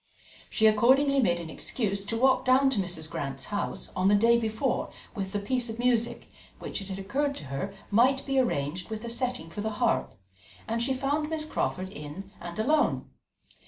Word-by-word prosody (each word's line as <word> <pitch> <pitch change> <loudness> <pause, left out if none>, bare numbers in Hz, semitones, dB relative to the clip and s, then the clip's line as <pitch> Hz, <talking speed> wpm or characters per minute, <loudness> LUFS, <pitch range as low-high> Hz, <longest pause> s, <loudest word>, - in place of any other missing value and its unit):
She 220 - +2
accordingly 265 +6 +5
made 175 -9 +2
an 165 -2 -7
excuse 200 +2 -2
to 225 +3 -1
walk 260 +2 +4
down 265 +1 +4
to 235 - +1
Mrs. 175 -4 -3
Grant's 135 -3 -4
house 205 - -2
on 185 +1 +2
the 205 - +6
day 230 +3 +5
before 225 +3 -1 0.2
with 195 -3 -4
the 205 - -1
piece 240 +4 -1
of 225 - -5
music, 240 -1 +1 0.3
which - - -4
it 195 - -7
had 190 -1 -4
occurred 275 +9 -1
to - - -8
her 190 +9 -2 0.2
might 255 +6 +4
be 270 -1 +2
arranged 175 - -1
with 220 +1 -5
a 235 - -2
setting 245 -8 -2
for 205 - -5
the 220 0 -2
harp; 240 0 +1 0.5
and 230 +1 -1
she 265 +2 +1
found 290 +3 0
Miss 315 -1 0
Crawford 185 -10 -2
in 165 +4 -8
and 170 0 -7
alone. 300 +8 +1
220 Hz, 195 wpm, -28 LUFS, 190-260 Hz, 0.5 s, the